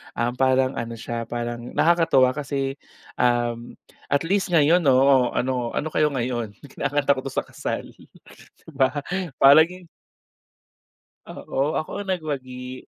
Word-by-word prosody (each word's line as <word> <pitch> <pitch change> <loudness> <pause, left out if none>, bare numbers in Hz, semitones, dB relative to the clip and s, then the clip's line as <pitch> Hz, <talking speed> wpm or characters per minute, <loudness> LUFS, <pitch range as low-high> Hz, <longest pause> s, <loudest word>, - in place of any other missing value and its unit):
um, 120 +1 0
parang 130 0 +3
ano 115 0 -5
siya 115 +1 -5
parang 120 0 -5
nakakatuwa 165 -6 +4
kasi, 135 -2 -3 0.4
um, 120 -1 0 0.4
at 140 +2 +2
least 195 0 0
ngayon 165 +2 +4
oo 130 -1 +4
ano 125 -2 -1
ano 155 - -1
kayo 150 -1 +3
ngayon 120 -4 -3
kinakanta 145 +1 0
ko 130 - -5
to - - -3
sa - - -1
kasal, - - -5
'di - - -20
ba 135 +1 +1 0.4
parang. 165 +6 +5 1.4
Oo, 140 +4 -2
ako 195 +6 -4
ang 195 - -8
nagwagi 130 -7 -5
135 Hz, 130 wpm, -23 LUFS, 120-150 Hz, 1.4 s, parang